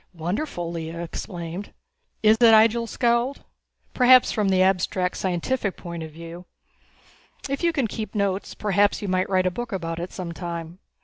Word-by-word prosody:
"Wonderful!" 175 - -3
Lea 165 -1 -5
exclaimed. 170 +2 -6 0.5
"Is 215 +1 +6
it?" 230 -2 +7
Ihjel 225 +1 +4
scowled. 240 +2 0 0.5
"Perhaps 255 0 +6
from 210 -3 0
the 185 -1 +4
abstract 185 -1 +1
scientific 190 +4 -2
point 170 -1 -7
of 160 - -6
view. 165 +3 -10 1.0
If 275 0 -3
you 340 - +3
can 280 -6 0
keep 220 -1 -5
notes 200 -1 -1
perhaps 205 0 +1
you - - -3
might 185 0 0
write 185 -1 +2
a 185 - +2
book 240 +5 -5
about 165 -3 -3
it 175 +2 -5
some 180 -3 -6
time. 170 0 -6
190 Hz, 165 wpm, -24 LUFS, 170-225 Hz, 1.0 s, it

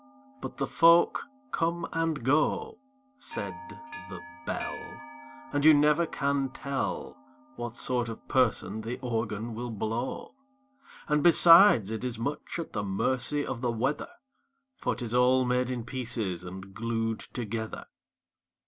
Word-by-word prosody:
But - - -7
the - - 0
folk 170 +7 +4 0.2
come 170 0 -1
and 165 -5 -1
go, 155 - +1 0.4
Said - - -5 0.6
the - - -7 0.3
Bell, 155 -3 -5 0.5
And 145 0 +1
you 155 0 +8
never 150 +3 +3
can 140 -2 0
tell 135 +1 -4 0.4
What 120 -1 -6
sort 125 -2 -1
of 115 - -9
person 110 -5 +1
the 115 +3 -4
Organ 115 -1 -2
will 120 +2 -5
blow! 115 +3 -4 0.7
And, 150 -1 +2
besides, 170 - +7
it 110 +1 -4
is 125 -2 -3
much 140 +9 -4
at 170 - -6
the 105 - -1
mercy 125 +8 -1
of 130 -3 -4
the 120 -2 0
weather 130 - -1 0.7
For - - -2
'tis 120 -2 -5
all 125 +1 +4
made 125 0 +1
in 125 -2 -3
pieces 115 -8 -3
and 95 +2 -9
glued 115 0 -2
together! 110 -2 -5
125 Hz, 135 wpm, -29 LUFS, 115-145 Hz, 0.7 s, you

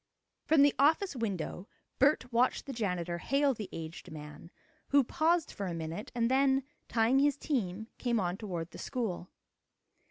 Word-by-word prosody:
From 305 -2 +6
the 285 - +5
office 315 +4 +3
window 200 -4 -3 0.3
Bert 260 -3 +3
watched 245 +2 +2
the 275 - -5
janitor 180 -6 -2
hail 275 - +2
the 215 -4 -7
aged 165 +1 -7
man, 150 +1 -9 0.4
who 280 -1 +5
paused 325 +6 +1
for 200 - -4
a 175 - -3
minute, 165 +5 -5
and 230 -1 +2
then, 270 0 +3 0.2
tying 235 +3 +3
his 290 0 +3
team, 220 - -2
came 240 -2 +1
on 180 -2 -1
toward 180 -5 -5
the - - -10
school. 205 -8 -3
230 Hz, 160 wpm, -31 LUFS, 180-275 Hz, 0.4 s, From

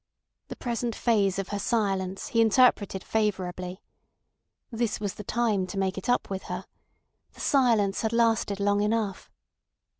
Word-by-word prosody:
The - - -7
present 235 -1 -3
phase 200 -5 +2
of 195 -1 -3
her 205 - -3
silence 195 -4 -1
he 230 - +3
interpreted 220 -4 +3
favourably. 185 -4 -2 0.9
This 230 -1 -1
was 205 -2 -3
the 210 - -8
time 215 -4 0
to 195 - -6
make 190 0 0
it 190 - -5
up 245 - +2
with 190 -1 -4
her. - - -5 0.7
The - - -18
silence 230 -8 +2
had 220 - 0
lasted 225 -3 +2
long 205 0 +2
enough. 210 -2 -1
205 Hz, 150 wpm, -27 LUFS, 195-230 Hz, 0.9 s, he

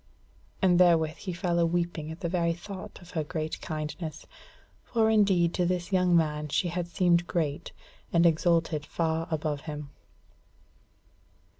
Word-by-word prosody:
And 180 -2 +5
therewith 165 -3 +4
he 185 - -5
fell 175 -1 -1
a 170 - +4
weeping 170 -2 -2
at 160 +3 -8
the 175 - -1
very 170 -1 +1
thought 185 +3 -9
of 175 - -14
her 160 - -1
great 155 0 -4
kindness: 155 0 -5 0.6
for 220 -2 +2
indeed 190 -6 +3
to 180 - +1
this 180 +1 -2
young 180 -2 +4
man 150 -2 0
she 175 +5 +1
had 175 0 -3
seemed 175 -1 +2
great, 150 -4 -2 0.4
and 170 0 +4
exalted 165 -2 +2
far 165 +1 -1
above 155 -3 -2
him. 150 -1 -6
170 Hz, 150 wpm, -28 LUFS, 155-180 Hz, 0.6 s, And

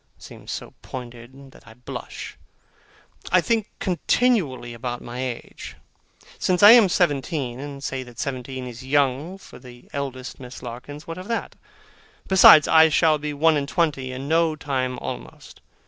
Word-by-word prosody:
seems - - -11
so - - -6
pointed, 125 +2 -10
that - - -19
I 110 - -14
blush. 125 - -8 1.0
I 185 - +6
think 220 +3 0
continually 175 - 0
about 120 +1 -5
my 120 +1 -8
age. 125 -2 -7 0.6
Say 185 - +1
I 205 +1 +10
am 230 -5 +7
seventeen, 145 -6 -1
and 140 0 -8
say 135 -1 -3
that 120 -2 -12
seventeen 130 -2 -5
is 125 +1 -9
young 140 +5 0
for 195 - -14
the 120 -2 -15
eldest 135 -2 -5
Miss 125 0 -10
Larkins, 125 +5 -8
what 165 +2 -7
of 185 - -9
that? 230 -1 -3 0.7
Besides, 180 -5 +8
I 160 0 +6
shall 155 -1 +3
be 150 0 -4
one 155 +2 +3
and 140 -1 -3
twenty 145 -7 0
in 130 +2 -6
no 160 0 +2
time 130 -4 -2
almost. - - -9
140 Hz, 155 wpm, -23 LUFS, 125-165 Hz, 1.0 s, I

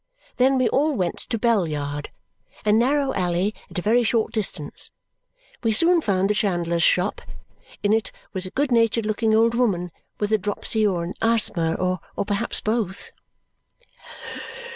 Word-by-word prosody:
Then 265 +1 +4
we 255 - +3
all 295 +3 +2
went 180 -6 -1
to 235 - -2
Bell 215 -7 +2
Yard, 145 -1 -4 0.6
a 210 - +4
narrow 265 +5 +2
alley 180 +2 0 0.2
at - - -8
a 180 - -2
very 230 +4 +4
short 225 -1 0
distance. 190 -8 0 0.7
We 225 - +1
soon 335 +8 +4
found 195 -6 +1
the 210 - +2
chandler's 175 -5 0
shop. 180 +4 +2 0.6
In 205 +1 +3
it 220 0 0 0.2
was 190 -1 -3
a - - -6
good 275 +5 -1
natured 230 -1 +2
looking 220 +1 +1
old 230 +1 +4
woman 195 -8 0 0.3
with 210 0 -1
a 215 - +4
dropsy, 210 +2 0
or 175 -4 -1
an 170 - -4
asthma, 205 -8 +1
or 185 0 -1 0.3
perhaps 205 -1 -1
both. 215 -4 -2
210 Hz, 160 wpm, -23 LUFS, 185-230 Hz, 0.7 s, Then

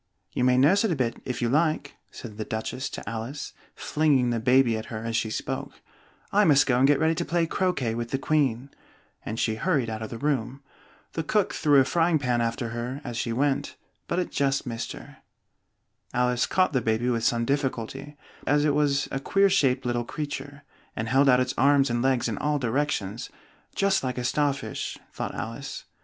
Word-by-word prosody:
you 125 - -1
may 125 0 +4
nurse 165 - +5
it 220 - +1
a 170 - +1
bit, 120 -4 -2
if 125 -1 -3
you - - +2
like!" 150 +1 +1 0.2
said 110 -4 -10
the 110 - -2
Duchess 110 +5 -4
to - - -8
Alice, 115 +5 -5 0.2
flinging 140 -5 +2
the 115 - 0
baby 125 0 +4
at 110 - -4
her 110 -1 -6
as 115 0 -2
she 110 - 0
spoke. 110 - -4 0.6
"I 210 +1 +4
must 145 -6 +5
go 125 -2 +2
and 135 - +5
get 145 -1 +4
ready 160 +1 +3
to - - -2
play 170 0 +1
croquet 165 - 0
with 115 0 -4
the 135 - 0
Queen," 135 -3 0 0.5
and 110 +1 -4
she 110 - +1
hurried 135 -7 0
out 110 0 -5
of 110 - -5
the 115 - -6
room. 135 -1 -2 0.5
The 165 - -1
cook 205 +5 +1
threw 145 -3 +4
a 135 - +4
frying 165 +1 +2
pan 125 -4 0
after 115 +1 -2
her 120 +4 -4
as 120 -3 -5
she 115 0 -2
went, 135 +3 0 0.3
but - - -1
it 180 - -1
just 135 -1 0
missed 115 -2 -4
her. - - -12 1.0
Alice 125 0 +2
caught 185 -4 +2
the 130 - +2
baby 110 +2 0
with 115 -2 -1
some 115 0 +2
difficulty, 135 +1 -3 0.3
as 145 0 +3
it 150 - +3
was 145 -2 +1
a 135 - -2
queer 195 +7 +3
shaped 135 -7 +2
little 120 -1 0
creature, 145 +1 -6 0.3
and 110 +1 -3
held 135 +2 +4
out 125 -1 +6
its 130 0 0
arms 140 -1 +4
and 120 0 0
legs 130 -2 +2
in 110 - -3
all 150 0 +1
directions, 120 -5 -2 0.5
"just 195 -4 +2
like 130 -1 -2
a 125 - -2
star 145 +3 +2
fish," 135 0 -5 0.2
thought - - -4
Alice. - - -6
130 Hz, 205 wpm, -26 LUFS, 120-145 Hz, 1.0 s, out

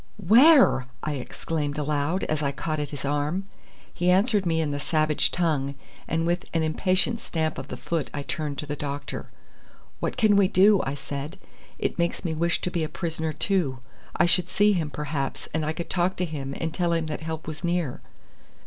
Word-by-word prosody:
"Where?" 225 - +6 0.2
I 155 - -1
exclaimed 145 +2 -3
aloud, 150 +4 0
as 155 -1 -1
I 140 -1 +1
caught 155 +2 -3
at 145 -1 -2
his 145 -1 -6
arm. 145 +7 -1 0.5
He 175 +1 +1
answered 200 +1 +3
me 165 -1 +1
in 155 -2 0
the 145 - -2
savage 155 0 +2
tongue, 145 -5 0 0.3
and 165 0 0
with 175 +2 0
an 165 - +2
impatient 185 +8 +1
stamp 160 -6 -2
of - - -7
the - - -6
foot 165 -4 -2
I 145 - -4
turned 150 -2 -3
to 150 - -4
the 145 0 -3
doctor. 145 0 -5 0.7
"What - - -2
can 215 -4 +4
we 200 -2 +5
do?" 195 +2 +5
I 135 - -2
said. 145 +3 -5 0.4
"It - - -2
makes 170 +2 0
me 165 - 0
wish 170 +2 +1
to 180 - -2
be 170 -3 0
a 155 - -2
prisoner 160 -2 -2
too. 170 -7 0 0.4
I - - +4
should 180 0 +3
see 210 0 +4
him, 165 -5 -1
perhaps, 145 -2 -3
and 160 0 0
I 155 - 0
could 170 +2 -5
talk 180 +1 +1
to 180 - 0
him 140 -4 -5
and 165 -1 -2
tell 170 0 +1
him 165 -1 0
that 155 0 -4
help 160 0 -5
was 155 -1 -6
near." 170 -6 -1
160 Hz, 200 wpm, -26 LUFS, 145-180 Hz, 0.7 s, Where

